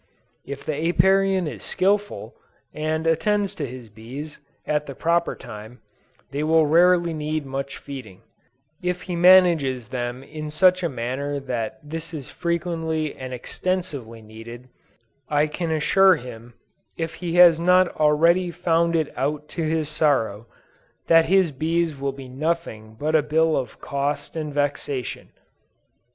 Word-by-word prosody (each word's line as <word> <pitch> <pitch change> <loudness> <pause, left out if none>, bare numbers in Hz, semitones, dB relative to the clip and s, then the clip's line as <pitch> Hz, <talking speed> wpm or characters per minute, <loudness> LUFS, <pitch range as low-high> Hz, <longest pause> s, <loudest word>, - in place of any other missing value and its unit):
If 140 0 -7
the 155 - -1 0.2
Apiarian 190 +1 +3
is - - -7
skillful, 205 +2 -1 0.4
and 155 +1 -2
attends 200 +5 +1
to 150 -7 -4
his 125 -1 -9
bees, 130 +8 -9 0.3
at 150 0 -1
the 140 - -7
proper 170 +3 +1
time, 110 +4 -10 0.5
they 145 - -2
will 160 +1 +4
rarely 170 +2 +4
need 155 -1 -3
much 135 +1 -5
feeding; 125 -10 -10 0.6
if 180 0 -2
he 180 - -4
manages 170 -9 +5
them 125 0 -4
in 155 +1 -7
such 185 +4 +4
a 170 - 0
manner 135 +3 -3
that 120 -4 -4
this 165 +2 -6
is 140 -4 -8
frequently 165 -3 -2
and 130 -1 -7
extensively 135 -4 -4
needed, 115 +3 -11 0.6
I 150 0 +3
can 160 +2 -4
assure 185 +5 +4
him, 120 -3 -10 0.4
if 165 0 -3
he 170 -1 -2
has 175 -2 +7
not 180 +1 +4
already 165 +4 +3
found 170 -1 +1
it 160 -2 0
out 150 +3 -2
to 170 - -4
his 160 -1 0
sorrow, 120 -8 0 0.6
that 165 -1 +6
his 185 -2 +3
bees 160 +3 0
will 140 0 -2
be 135 -1 -10
nothing 130 -6 -3
but 155 +2 -1
a 155 - +5
bill 160 +2 +2
of 130 -4 -4
cost 140 +3 -3
and 155 -2 -3
vexation. 145 -2 -3
155 Hz, 145 wpm, -23 LUFS, 135-170 Hz, 0.6 s, has